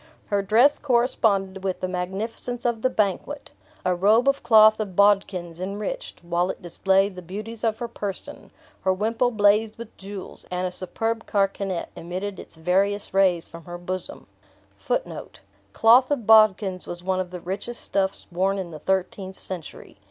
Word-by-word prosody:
Her 205 -1 +1
dress 235 +9 +4
corresponded 220 -7 +1
with 190 -2 -2
the 185 - -2
magnificence 200 +7 -4
of 235 -2 0
the 255 - +2
banquet, 220 +6 -2 0.3
a 180 - +3
robe 210 +8 +3
of 275 0 +2
cloth 215 -1 +6
of 200 -4 -4
Baudkins 190 -4 +2
enriched, 200 -1 -5
while 175 +1 0
it - - -4
displayed, 190 +2 +1
the 180 - -7
beauties 215 +6 -7
of 225 -1 +1
her 240 - -4
person; 205 -4 -7 0.3
her 190 - +3
wimple 225 +6 +1
blazed 215 0 +3
with 230 -1 -10
jewels, 195 -1 -8
and 180 0 -2
a 180 - -2
superb 225 +5 -3
carkanet 195 -3 -1
emitted 185 +3 -5
its - - -10
various 195 +5 0
rays 185 -3 +3
from 165 -1 -12
her 175 0 -7
bosom. 185 +1 -6 1.5
Cloth 240 +3 +5
of 280 -7 -1
Baudkins 210 -4 +4
was 175 0 -7
one 185 0 0
of 185 -1 -3
the 180 0 -7
richest 200 +7 -5
stuffs 195 -1 -1
worn 190 +3 +1
in 185 -3 -5
the 155 - -8
thirteenth 190 +2 -2
century. 175 - -7
195 Hz, 160 wpm, -24 LUFS, 185-220 Hz, 1.5 s, cloth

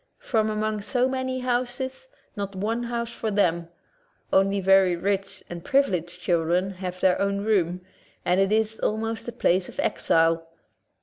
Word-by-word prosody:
From 220 -3 0
among 215 0 -1
so 250 +4 +1
many 260 -1 -2
houses, 255 - -2 0.3
not 200 -2 -4
one 225 +5 -1
house 235 0 -3
for 225 -1 -3
them; 170 -5 +1 0.7
only 195 +1 +3
very 190 -1 +4
rich 195 +1 -2
and 170 -1 -7
privileged 180 - +1
children 175 +2 +1
have 185 -1 -6
their 185 0 +3
own 200 0 0
room, 180 -5 +1 0.4
and 180 +1 +3
it 195 +1 +2
is 220 0 +1
almost 225 +1 -2
a - - -3
place 185 -5 +1
of - - -11
exile. 165 0 +2
200 Hz, 150 wpm, -25 LUFS, 180-230 Hz, 0.7 s, very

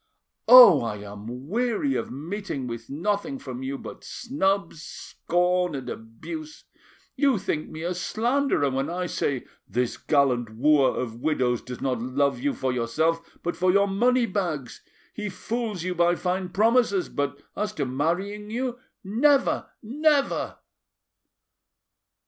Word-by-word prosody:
Oh! 245 - +10
I 115 -3 -2 0.2
am 120 +6 -8
weary 245 - 0
of - - -2
meeting 160 -1 -5
with 115 -1 -7
nothing 205 - -2
from 130 - -7
you 135 +1 -3
but - - -10
snubs, 195 - -1
scorn, 180 +2 -1
and 135 - -6
abuse. 305 - -8 0.5
You 275 -5 +3
think 155 -5 -3
me 160 0 -7
a 175 +1 -1
slanderer 225 - 0
when 135 +1 -1
I 180 +1 -2
say, 140 -6 -2 0.2
'This 125 0 -1
gallant 125 -7 +1
wooer 145 +1 +5
of 115 -1 -5
widows 125 -6 +1
does 125 -1 -8
not 125 -4 -1
love 140 - 0
you 280 +1 -1
for 130 -1 -1
yourself 160 +8 -1
but 175 - -2
for 185 +1 +2
your 200 +1 +4
money 240 +5 +2
bags. 170 - -3 0.3
He 210 -1 -4
fools 215 0 -4
you 180 0 -1
by 175 0 +3
fine 185 +1 -2
promises, 215 -1 +2
but 140 0 -3 0.2
as 210 0 -2
to 145 - -2
marrying 180 +11 -2
you—never, 250 +2 0
never! 290 +4 +1
175 Hz, 135 wpm, -25 LUFS, 135-215 Hz, 0.5 s, Oh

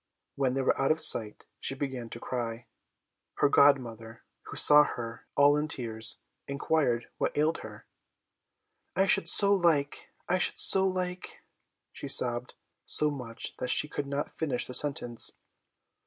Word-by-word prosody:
When 135 -2 -1
they 135 - -1
were - - 0
out 135 - +1
of 155 - +2
sight, 110 -8 +3
she 135 - -3
began 130 -4 -6
to 115 - -8
cry. 120 -1 -5 0.7
Her - - +2
godmother, 115 -6 +1 0.2
who - - -8
saw 150 0 +6
her 115 -5 -7
all 145 +1 +5
in 150 +1 -2
tears, 115 -6 +1 0.3
inquired 140 -4 -1
what - - -2
ailed 155 +2 0
her. - - -12 1.1
"I 190 - +2
should 170 -3 +2
so 200 +2 +3
like 165 -7 0 0.2
I 185 +1 0
should - - 0
so 190 0 +3
like 180 -1 -5 0.2
" - - -56
she - - -7
sobbed 120 0 +2 0.3
so 150 0 +2
much 120 -5 -6
that 125 - -4
she - - +4
could 145 -1 -5
not 140 +1 -4
finish 140 -6 -2
the 125 - -9
sentence. 125 -4 +2
140 Hz, 155 wpm, -28 LUFS, 120-150 Hz, 1.1 s, saw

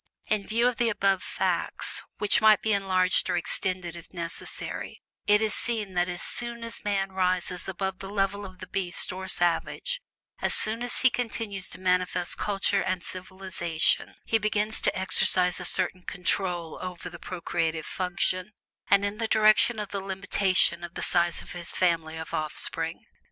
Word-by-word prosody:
In 210 -2 -1
view 235 +3 +3
of 250 - 0
the 235 -1 +3
above 195 -3 +2
facts, - - 0 0.2
which 210 +3 +3
might 215 -1 +6
be 220 - +2
enlarged 185 -2 +2
and - - +1
extended 175 0 -2
if 170 - -11
necessary, 170 -1 -6 0.3
it 210 +1 +5
is 215 - 0
seen 220 -5 -2
that 175 0 +1
as 175 0 -5
soon 235 -1 -3
as 230 -1 -6
man 195 -2 0
rises 185 -1 0
above 190 0 -3
the 195 - -7
level 200 0 0
of 185 -2 -9
the 185 - -8
beast 185 -2 -2
or 190 0 -6
savage 185 - 0 0.4
as - - +3
soon 225 +2 0
as 245 0 -1
he 255 - +6
begins 225 -6 -3
to - - -8
manifest 180 -1 +1
culture 200 -2 +1
and 185 -2 -1
civilization 185 -3 -1
he 225 - +2
begins 215 0 0
to - - +1
exercise 185 -1 +3
a 180 - -5
certain 185 0 +2
"control" 180 -2 -2
over 180 -1 -6
the 170 -1 -9
procreative 165 -3 -2
FUNCTION, 185 +1 -1 0.4
and 200 0 +5
in 205 +2 -3
the 225 - 0
direction 220 +2 +5
of 210 -2 -4
the 200 - -3
limitation 190 -2 +1
of 170 0 -7
the - - -3
size 175 -1 +3
of - - -11
his 175 -1 -2
family 165 -3 +1
of 160 0 -7
offspring. 155 -1 -1
190 Hz, 170 wpm, -27 LUFS, 180-210 Hz, 0.4 s, might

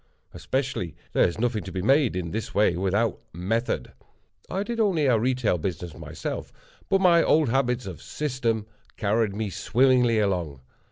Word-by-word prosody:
Especially, 130 - -2 0.2
there - - +4
is 85 - -5
nothing 115 -3 0
to - - -7
be 95 -1 -3
made 135 -1 +3
in 85 -3 -3
this 110 +1 -4
way 105 -4 +3
without 100 +5 0
method. 110 +8 -2 0.6
I 195 +2 -1
did 235 +2 -4
only 190 -9 +2
a 120 -4 +4
retail 125 -6 +1
business 85 -1 -4
myself, - - -6 0.4
but 195 -1 +3
my 170 -3 +6
old 155 -5 +3
habits 125 -1 +1
of 95 -4 -7
system 120 -7 -2 0.3
carried 105 -1 +1
me 105 -1 -3
swimmingly 125 +1 +3
along. 90 -10 -1
115 Hz, 160 wpm, -25 LUFS, 95-135 Hz, 0.6 s, my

